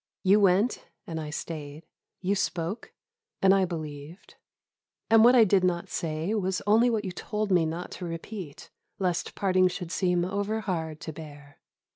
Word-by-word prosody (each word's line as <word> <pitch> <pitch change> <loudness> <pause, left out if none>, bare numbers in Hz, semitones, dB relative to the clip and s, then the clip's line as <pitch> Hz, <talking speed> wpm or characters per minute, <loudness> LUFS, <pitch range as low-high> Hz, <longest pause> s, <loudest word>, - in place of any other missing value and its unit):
You 195 +2 +5
went 200 +4 +2 0.2
and 160 -1 -4
I 150 - -5
stayed; 150 0 -6 0.4
you 190 +2 +1
spoke 185 0 -2 0.5
and 195 0 +5
I 195 -1 +3
believed; 155 -1 -8 0.8
and 225 -1 +7
what 245 +2 +7
I 235 - +8
did 195 -2 +3
not 175 -1 0
say 160 +4 -2
was 190 -3 0
only 225 +4 +5
what 220 -3 -1
you 185 - -3
told 210 +3 -3
me 175 -3 +4
not 165 +3 -5
to 180 - -6
repeat, 165 -1 -7 0.3
lest 180 -3 -2
parting 185 -2 +3
should 180 -1 -5
seem 180 -2 +1
over 205 +3 -2
hard 160 -6 -3
to 160 - -6
bear. 145 -2 -12
180 Hz, 165 wpm, -27 LUFS, 160-200 Hz, 0.8 s, I